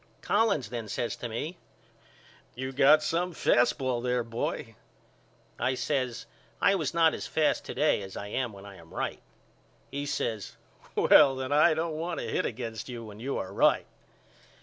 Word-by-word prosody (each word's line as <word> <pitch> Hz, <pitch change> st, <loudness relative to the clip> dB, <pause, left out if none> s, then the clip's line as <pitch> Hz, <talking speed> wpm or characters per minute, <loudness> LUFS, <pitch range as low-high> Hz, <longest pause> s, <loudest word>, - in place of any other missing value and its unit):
Collins 205 Hz, -, +2 dB
then 115 Hz, -3 st, -4 dB
says 115 Hz, +3 st, -2 dB
to 120 Hz, -, -5 dB
me 150 Hz, +10 st, -4 dB, 1.0 s
You 130 Hz, +1 st, -4 dB
got 145 Hz, +3 st, +5 dB
some 175 Hz, +2 st, -1 dB
fast 120 Hz, -5 st, +3 dB
ball 130 Hz, -3 st, -1 dB
there 125 Hz, 0 st, 0 dB
boy. 115 Hz, +1 st, -4 dB, 0.9 s
I 130 Hz, +2 st, +1 dB
says 125 Hz, -3 st, -2 dB, 0.3 s
I -, -, +4 dB
was 160 Hz, -8 st, 0 dB
not 165 Hz, -1 st, +5 dB
as -, -, -5 dB
fast 155 Hz, -1 st, +1 dB
to -, -, -6 dB
day -, -, +2 dB
as 95 Hz, -1 st, -8 dB
I 100 Hz, -, -5 dB
am 120 Hz, +3 st, -2 dB
when 100 Hz, -1 st, -12 dB
I 100 Hz, -1 st, -11 dB
am 80 Hz, -2 st, -16 dB
right. -, -, -3 dB, 0.7 s
He 140 Hz, +1 st, -3 dB
says 110 Hz, -7 st, -3 dB, 0.4 s
Well 140 Hz, -3 st, +6 dB
then 130 Hz, +1 st, -4 dB
I 150 Hz, +2 st, +5 dB
don't 160 Hz, 0 st, -1 dB
want 170 Hz, +1 st, -3 dB
to -, -, -4 dB
hit -, -, 0 dB
against 115 Hz, -1 st, -6 dB
you 120 Hz, -2 st, -6 dB
when 105 Hz, -1 st, -11 dB
you 135 Hz, +4 st, -3 dB
are 95 Hz, +1 st, -5 dB
right. -, -, +3 dB
130 Hz, 175 wpm, -29 LUFS, 115-155 Hz, 1.0 s, Well